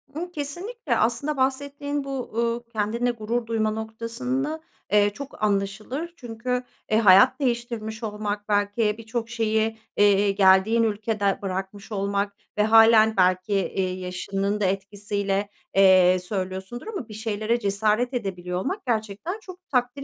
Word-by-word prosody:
Imm, 350 +3 -4
kesinlikle 320 - -3
aslında 260 +6 0
bahsettiğin 285 +2 -1
bu, 275 - -8
uuu, 235 0 -2
kendinle 225 +3 0
gurur 230 +1 -3
duyma 220 -1 0
noktasında, 235 +7 -3 0.3
eee, 205 0 +5
çok 270 -2 -9
anlaşılır. 215 +11 -1
Çünkü, 250 +1 -3 0.3
eee, 215 - +4
hayat 225 +5 +6
değiştirmiş 235 -4 -2
olmak 210 -1 -4
belki 205 +1 +1
birçok 230 +1 -4
şeyi, 220 -1 0 0.2
eee, 205 0 +4
geldiğin 195 +3 +4
ülkede 210 -2 0
bırakmış 195 +2 -5
olmak 200 0 -1 0.2
ve 210 - +4
hâlen 220 0 +6
belki, 185 +2 +2
eee, 190 -1 0
yaşının 195 +2 -2
da - - +2
etkisiyle, 200 +1 -2 0.3
eee, 185 -1 +6
söylüyorsundur 190 - -5
ama 395 - -5
bir 215 - -10
şeylere 220 +2 -1
cesaret 215 +4 +1
edebiliyor 180 -6 -3
olmak 370 - -3
gerçekten 225 - -2
çok 370 -3 -13
takdir 250 +1 0
220 Hz, 130 wpm, -25 LUFS, 200-245 Hz, 0.3 s, hayat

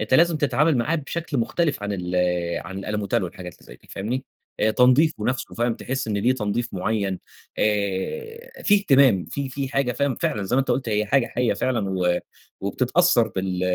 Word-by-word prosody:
أنت 110 +4 0
لازم 170 +1 +5
تتعامل 145 +1 +2
معاه 150 +8 +1
بشكل 155 -1 -3
مُختلف 145 +1 0
عن 105 0 -2
ال 90 -1 -4 0.5
عن 95 +1 -6
الألموتال 105 +2 -1
والحاجات 90 0 -8
اللي - - -21
زي - - -12
دي، - - -26
فاهمني؟ 120 +7 -3 0.4
آآ 110 - +3
تنضيفه 125 +1 +3
نفسه 125 0 -2
فاهم 120 -1 0
تحس 130 -1 -4
إن 105 - -1
ليه 120 +5 +3
تنضيف 120 +1 -2
مُعين، 95 0 -1 0.4
آآ 105 - -2
في 205 - +5
اهتمام 135 - +4
في 140 -1 -4
في 135 0 -4
حاجة 135 -2 0
فاهم 140 +1 0
فعلًا، 105 -2 -1
زي 110 +7 0
ما - - +5
أنت 135 - -2
قُلت 130 -3 0
هي 105 0 +1
حاجة 130 +1 +2
حية 125 -1 0
فعلًا، 115 -6 -1
و 90 -2 +1 0.4
وبتتأثر 120 - +2
بال 95 -1 -3
120 Hz, 190 wpm, -23 LUFS, 100-140 Hz, 0.5 s, لازم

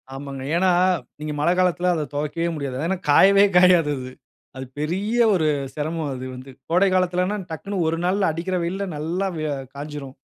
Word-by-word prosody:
ஆமாங்க. 135 -1 -7
ஏன்னா, 185 +2 +3 0.5
நீங்க 150 0 -4
மழை 150 +4 +2
காலத்தில 180 0 +2
அத 155 - -2
துவைக்கவே 150 +4 -2
முடியாது. 140 -4 -4
ஏன்னா 190 0 -1
காயவே 200 +5 +6
காயாது 180 -4 +5
அது. 130 0 -7 0.5
அது 130 - -5
பெரிய 190 +9 -2 0.2
ஒரு 160 -4 +2 0.3
சிரமம் 155 0 -3
அது 130 0 -6
வந்து 130 +2 -10 0.2
கோடை 180 +4 +4
காலத்துலன்னா 185 +2 +1
டக்குன்னு 185 +3 -3
ஒரு 165 +1 0
நாளில் 190 0 +2
அடிக்கிற 170 +4 -3
வெயில்ல 190 +4 -2
நல்லா 165 +6 -2
வ - - -5 0.4
காஞ்சிரும். 145 -2 -7
165 Hz, 165 wpm, -22 LUFS, 150-185 Hz, 0.5 s, காயவே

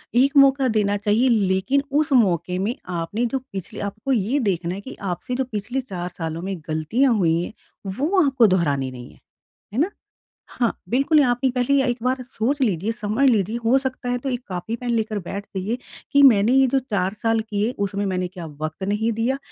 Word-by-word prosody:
एक 275 +4 +4
मौका 275 -1 +6
देना 205 -1 +2
चाहिए 210 +5 +2
लेकिन 205 +5 +2 0.2
उस 300 - -3
मौके 180 -6 +2
में 215 +6 -1 0.3
आपने 210 +9 -2
जो 270 - +1
पिछले 190 -3 -6
आपको 215 +7 -5
ये 235 +5 +1
देखना 175 0 -2
है 200 - -7
कि - - -8 0.2
आपसे 250 +8 -5
जो 265 - 0
पिछले 225 +5 -2
4 180 -7 -5
सालों 165 -1 -4
में 195 - -2
गलतियाँ 220 - +2
हुई 165 -3 +2
हैं, 175 - -6 0.3
वो 300 - +1
आपको 260 -5 +4
दोहरानी 140 -6 0
नहीं 125 -1 -10
है। - - -21 0.6
है - - -2
ना? 360 - +2 0.6
हाँ, 240 -2 0 0.2
बिल्कुल 280 +5 +4
आपने 245 +2 +1
पहली 255 +3 +2
एक 245 -1 0
बार 255 +1 0
सोच 260 +3 -2
लीजिए, 205 -2 +1
समझ 220 +3 0
लीजिए 215 -1 +1
हो 235 +4 +4
सकता 260 -2 -3
है 245 - +1
तो 270 +2 -4
1 245 -1 -2
कॉपी, 185 +4 -4
पेन 245 +1 -5
लेकर 220 -3 0
बैठ 200 +3 -6
जाइए 205 +6 -2 0.3
कि 280 - +5
मैंने 220 -4 +6
ये 265 0 +5
जो 270 +2 +2
4 200 -7 -2
साल 225 0 +2
किए 210 +3 0
उसमें 200 +1 -3
मैंने 185 -1 -1
क्या 175 -2 -9 0.2
वक़्त 155 +4 -4
नहीं 220 +3 0
दिया? 235 +5 0
225 Hz, 200 wpm, -22 LUFS, 190-260 Hz, 0.6 s, मौका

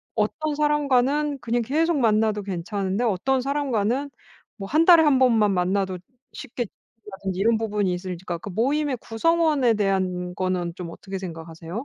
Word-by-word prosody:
어떤 300 +8 -1
사람과는 290 -1 +1
그냥 240 +1 0
계속 315 +6 +1
만나도 215 -3 +2
괜찮은데 195 +3 -2
어떤 245 +6 +1
사람과는 275 -1 -1 0.5
뭐 195 -1 -6
1 310 +7 +3
달에 340 -3 +8
1 290 -3 +4
번만 225 -5 +4
만나도 185 0 0 0.4
쉽게 240 0 -5
지친다든지 195 -3 -9
이런 225 +2 +3
부분이 205 -4 -1
있을지가 180 -1 -5
그러니까 200 +3 -8
모임의 285 0 0
구성원에 295 0 +2
대한 185 -3 -1
거는 180 -2 -2
좀 175 -2 -7
어떻게 195 +2 -7
생각하세요? 165 -2 -8
215 Hz, 360 characters per minute, -24 LUFS, 190-275 Hz, 0.5 s, 달에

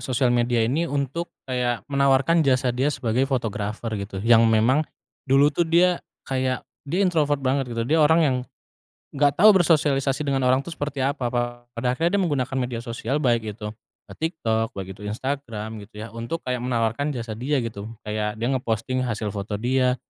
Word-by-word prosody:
sosial 125 0 +1
media 120 -1 +2
ini 155 +9 0
untuk 145 +4 -2 0.2
kayak 125 -4 -1
menawarkan 140 +3 +3
jasa 130 -4 +2
dia 130 +4 +1
sebagai 130 -2 0
fotografer 110 -3 -2
gitu 100 -1 -5
yang 115 -1 +6
memang 115 +6 +4 0.5
dulu 140 +2 +5
tuh 170 - +1
dia 175 +2 +4 0.2
kayak 130 -1 -1 0.2
dia 185 +7 +1
introvert 150 -6 +1
banget 130 -2 0
gitu, 115 - 0
dia 160 +5 +2
orang 160 +2 +5
yang, 130 -3 +2 0.8
gak 145 -1 +4
tau 215 +2 +9
bersosialisasi 150 -7 +3
dengan 135 -2 0
orang 130 +2 +3
tuh 170 - -8
seperti 145 -3 -4
apa 135 -1 0
pa 120 0 -2
pada 120 +2 -4
akhirnya 165 +9 0
dia 195 - +2
menggunakan 135 -6 -1
media 125 -1 -2
sosial, 115 +3 -3
baik 115 -7 0
itu 105 - -5 0.4
ke - - -9
TikTok 115 -9 0
baik 95 -1 -5
itu 95 - -19
Instagram 115 -3 -4
gitu 105 - -19
ya 115 - -8
untuk 115 +8 -5
kayak 125 -1 -2
menawarkan 120 +3 0
jasa 115 -2 -4
dia 140 +5 0
gitu 110 -2 -6 0.2
kayak 105 0 -2
dia 120 +3 -1
nge-posting 125 0 -1
hasil 110 -4 -2
foto 100 +1 -3
dia, 125 +2 +2
130 Hz, 180 wpm, -24 LUFS, 115-145 Hz, 0.8 s, tau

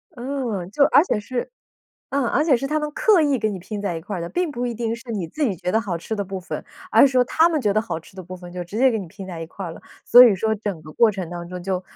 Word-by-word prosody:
嗯， 240 -8 -3
就 280 - +3
而 295 - +5
且 220 - -1
是 245 - -4 0.6
嗯， 275 -3 0
而 300 - +2
且 280 -6 +4
是 275 - -3
它 305 +2 0
们 300 0 -3
刻 430 -7 +4
意 280 -4 +2
给 215 -1 0
你 190 - -5
拼 205 +3 -6
在 180 -5 -2
一 - - -5
块 200 +3 -5
儿 - - -4
的， 170 - -4
并 355 -3 -1
不 245 0 -2
一 235 - -3
定 230 0 -2
是 235 0 -10
你 195 -6 -2
自 300 - -6
己 210 -10 +1
觉 180 - -3
得 220 - +3
好 190 -6 -3
吃 220 +6 -5
的 205 - -2
部 190 0 -5
分。 180 - -6 0.3
而 - - +6
是 - - +2
说 250 -1 +4
它 320 +6 +3
们 320 -3 0
觉 205 -4 +1
得 215 - +2
好 220 -7 -4
吃 165 - -18
的 185 - -7
部 185 +1 -9
分 175 -1 -11
就 180 -1 -4
直 195 +5 -8
接 260 0 +5
给 225 - -1
你 190 - -6
拼 195 +2 -10
在 170 -3 -7
一 165 - -5
块 195 +3 -8
儿 165 - -6
了， - - -12 0.2
所 245 +1 +9
以 220 -5 +5
说 220 +3 0
整 200 -6 -4
个 155 - -11
过 230 +4 +4
程 185 -4 -5
当 175 0 -6
中 180 -1 -7
就 185 0 -2
215 Hz, 345 characters per minute, -22 LUFS, 180-255 Hz, 0.6 s, 所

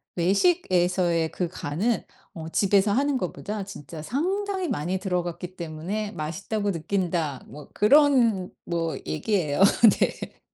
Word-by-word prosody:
외식에서의 180 - +2
그 180 - -2
간은 180 +7 -2 0.3
어 160 -4 -7
집에서 200 +3 +3
하는 275 +4 +1
것보다 205 0 -4
진짜 165 -5 -9
상당히 375 - -1
많이 180 - -2
들어갔기 180 -1 -3
때문에 175 +6 -4
맛있다고 195 +6 -3
느낀다. 165 -4 -2
뭐 150 +1 -12
그런 235 -5 +4
뭐 165 -1 -2
얘기예요. 155 -2 0 0.4
네. - - -2
185 Hz, 270 characters per minute, -25 LUFS, 165-215 Hz, 0.4 s, 그런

